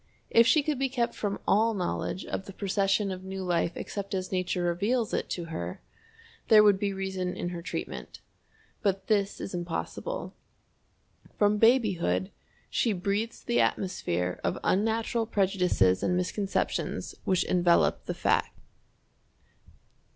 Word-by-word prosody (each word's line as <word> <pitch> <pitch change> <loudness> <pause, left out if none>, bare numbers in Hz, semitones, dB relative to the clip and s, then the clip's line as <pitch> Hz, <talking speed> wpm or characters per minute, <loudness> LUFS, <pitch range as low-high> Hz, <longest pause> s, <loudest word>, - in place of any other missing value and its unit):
If 230 +1 +6
she 305 +1 +5
could 295 -3 -1
be 270 0 +1
kept 245 -2 0
from 200 -1 -3
all 220 +2 +3
knowledge 185 0 -2
of 190 - -4
the 195 - -8
procession 195 0 +1
of 185 0 -6
new 190 0 -5
life 170 -1 0
except 200 -1 -4
as 185 -1 -3
Nature 185 -1 -1
reveals 205 +7 0
it - - -1
to 175 - -3
her, 85 +1 -4 0.7
there 215 -1 +8
would 205 -2 +5
be 200 0 0
reason 190 -2 -3
in 175 - -3
her 175 -1 -5
treatment. 170 -1 -6 0.6
But 195 -2 0
this 205 -2 +1
is 190 - -6
impossible. 175 - -4 1.0
From 210 0 +3
babyhood 195 - +3 0.4
she 230 - +1
breathes 200 +5 -2
the 240 - +2
atmosphere 90 - -1
of - - 0
unnatural 225 +3 +1
prejudices 180 - +2
and 180 - +1
misconceptions 195 +2 -2
which 185 -2 +2
envelop 175 -1 +2
the - - -3
fact. - - +1
195 Hz, 140 wpm, -28 LUFS, 180-215 Hz, 1.0 s, there